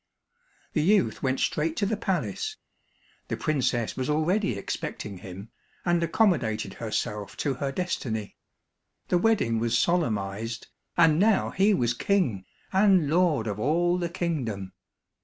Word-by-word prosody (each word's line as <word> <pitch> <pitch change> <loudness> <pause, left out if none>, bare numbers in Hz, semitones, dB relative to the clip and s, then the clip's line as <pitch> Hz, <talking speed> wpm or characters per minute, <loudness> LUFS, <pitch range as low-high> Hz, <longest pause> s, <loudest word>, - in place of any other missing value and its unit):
The 155 - +2
youth 195 +5 +2
went 130 -1 0
straight 160 +2 0
to 205 - +1
the 220 +2 0
palace. 230 - -2 0.7
The - - -3
princess 130 -7 0
was 130 +1 -2
already 155 - +1
expecting 100 0 -5
him, 95 +4 -9 0.3
and 175 -1 +2
accommodated 130 - +1
herself 105 -2 -3
to 140 - 0
her 140 -1 0
destiny. 120 - -3 0.7
The 180 - +3
wedding 175 - +2
was 115 0 +1
solemnized, 115 - -1 0.3
and 165 -2 +5
now 210 0 +3
he 200 +2 +3
was 120 -7 +1
king, 125 - 0 0.3
and 190 -6 +4
lord 165 -8 +3
of 105 -1 -3
all 175 +8 +2
the 175 -1 -1
kingdom. 125 - -3
150 Hz, 135 wpm, -27 LUFS, 115-180 Hz, 0.7 s, and